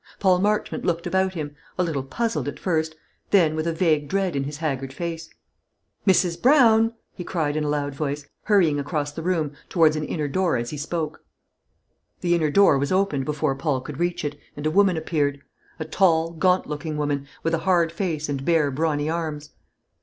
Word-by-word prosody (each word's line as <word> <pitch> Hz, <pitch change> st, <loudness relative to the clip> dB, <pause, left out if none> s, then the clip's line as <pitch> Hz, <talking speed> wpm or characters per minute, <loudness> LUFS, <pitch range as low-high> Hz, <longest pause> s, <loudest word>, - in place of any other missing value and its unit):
Paul 185 Hz, -2 st, +3 dB
Marchmont 210 Hz, +2 st, 0 dB
looked 170 Hz, -1 st, -1 dB
about 190 Hz, +1 st, 0 dB
him 145 Hz, -3 st, -5 dB, 0.2 s
a 180 Hz, -, +2 dB
little 160 Hz, -6 st, -1 dB
puzzled 230 Hz, -, -2 dB
at -, -, -4 dB
first; 160 Hz, -3 st, -1 dB, 0.3 s
then 165 Hz, -6 st, +4 dB
with 155 Hz, +1 st, -2 dB
a -, -, +1 dB
vague 160 Hz, -3 st, +1 dB
dread 190 Hz, -3 st, 0 dB
in 135 Hz, -1 st, -1 dB
his 145 Hz, +1 st, -5 dB
haggard 135 Hz, -4 st, -3 dB
face. 165 Hz, +2 st, -5 dB, 0.8 s
"Mrs. 180 Hz, -3 st, +3 dB
Brown!" 230 Hz, -4 st, +5 dB, 0.2 s
he 180 Hz, -, -7 dB
cried, 155 Hz, -5 st, -1 dB
in 155 Hz, -, 0 dB
a 150 Hz, -, -1 dB
loud 145 Hz, -1 st, -1 dB
voice, 145 Hz, 0 st, -3 dB, 0.2 s
hurrying 175 Hz, -9 st, +3 dB
across 145 Hz, +1 st, -2 dB
the 160 Hz, -, -6 dB
room 165 Hz, -4 st, 0 dB, 0.2 s
towards 160 Hz, -3 st, +4 dB
an 155 Hz, -, -2 dB
inner 150 Hz, -1 st, -2 dB
door 180 Hz, +5 st, +1 dB
as 120 Hz, 0 st, -3 dB
he 150 Hz, -, -5 dB
spoke. 155 Hz, +1 st, -4 dB, 1.0 s
The 175 Hz, -1 st, +2 dB
inner 160 Hz, -3 st, +2 dB
door 170 Hz, -4 st, +5 dB
was 140 Hz, +4 st, -1 dB
opened 185 Hz, -8 st, +1 dB
before 150 Hz, -1 st, 0 dB
Paul 140 Hz, -1 st, -1 dB
could 140 Hz, +2 st, -8 dB
reach 175 Hz, -1 st, -1 dB
it, 145 Hz, 0 st, -4 dB, 0.2 s
and 145 Hz, -, -5 dB
a 155 Hz, -, +2 dB
woman 195 Hz, -1 st, +4 dB
appeared; 145 Hz, -3 st, -1 dB, 0.4 s
a 155 Hz, -, -3 dB
tall, 165 Hz, -1 st, +2 dB
gaunt 180 Hz, +2 st, +2 dB
looking 150 Hz, +1 st, -4 dB
woman, 145 Hz, -2 st, -1 dB, 0.2 s
with 165 Hz, -, 0 dB
a 165 Hz, -, +2 dB
hard 170 Hz, -2 st, +2 dB
face 165 Hz, -4 st, -2 dB
and 140 Hz, -2 st, -3 dB
bare, 155 Hz, -3 st, +2 dB
brawny 150 Hz, +1 st, 0 dB
arms. 155 Hz, -3 st, -3 dB
160 Hz, 195 wpm, -24 LUFS, 145-180 Hz, 1.0 s, Brown